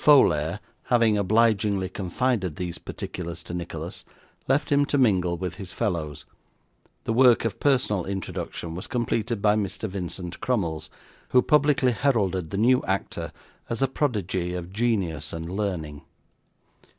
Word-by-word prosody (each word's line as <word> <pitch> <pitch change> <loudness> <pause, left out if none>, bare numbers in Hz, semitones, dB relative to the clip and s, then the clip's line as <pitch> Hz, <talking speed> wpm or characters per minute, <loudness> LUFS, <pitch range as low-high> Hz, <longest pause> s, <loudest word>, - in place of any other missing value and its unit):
Folair 85 - +5 0.3
having 115 -4 +4
obligingly 105 -1 +2
confided 95 - -1
these 90 0 -4
particulars 85 -1 -6
to 85 - -8
Nicholas, 85 -1 -5 0.4
left 140 +4 +1
him 145 0 +5
to 145 - 0
mingle 90 -9 +3
with 90 0 -4
his 95 -4 -6
fellows; 85 -9 -2 0.8
the 115 - -1
work 125 -1 +5
of 115 - -2
personal 125 - +2
introduction 95 -3 -4
was 90 - -6
completed 115 -2 -1
by 105 -1 +5
Mr. 105 +1 -2
Vincent 90 -2 -5
Crummles, 85 -11 -1 0.4
who 125 -1 +5
publicly 145 -4 +4
heralded 100 - +1
the 100 - -3
new 125 +4 +4
actor 95 +1 -2 0.4
as 115 +3 0
a - - +4
prodigy 95 - -1
of 90 +1 -6
genius 95 -10 0
and 80 +1 -5
learning. 85 -8 -3
100 Hz, 140 wpm, -26 LUFS, 90-120 Hz, 0.8 s, Folair